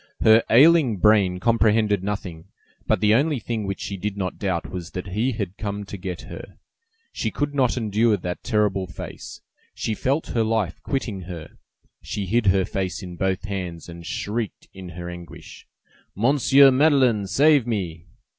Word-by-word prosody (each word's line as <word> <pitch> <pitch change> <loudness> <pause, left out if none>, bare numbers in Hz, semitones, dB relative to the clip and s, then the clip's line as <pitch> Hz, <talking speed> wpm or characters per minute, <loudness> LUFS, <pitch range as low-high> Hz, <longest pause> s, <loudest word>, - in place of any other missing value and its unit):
Her 110 +1 +6
ailing 140 -2 +5
brain 100 -2 +3
comprehended 110 -2 +2
nothing, 95 -5 -5 0.4
but - - +1
the 105 0 +4
only 145 +5 +2
thing 110 -3 -4
which 100 -1 -4
she 100 - -4
did 100 +2 -4
not 95 -2 -4
doubt 95 -5 -2
was 90 -3 -6
that 90 +1 -5
he 115 +7 0
had 100 -4 -4
come 100 -1 -4
to 100 - -8
get 90 -2 -6
her. - - -10 0.6
She - - -2
could 145 0 -2
not 130 -3 +1
endure 110 -1 +2
that 90 -1 -5
terrible 105 -4 0
face; 80 - -9 0.3
she 110 - -2
felt 135 +8 -1
her 115 - +1
life 110 -5 -1
quitting 115 -8 -3
her; 85 -3 -8 0.5
she 100 - -4
hid 110 +3 +1
her 95 0 +3
face 95 0 -3
in 90 -1 -8
both 95 +1 -1
hands, 90 -5 -5
and 85 0 -10
shrieked 105 +5 -4
in 95 -2 -9
her 85 0 -6
anguish:— 85 -1 -11 0.5
"Monsieur 135 +4 +5
Madeleine, 130 -7 +3
save 140 +3 +4
me!" 90 -6 -3
105 Hz, 165 wpm, -23 LUFS, 95-115 Hz, 0.6 s, Her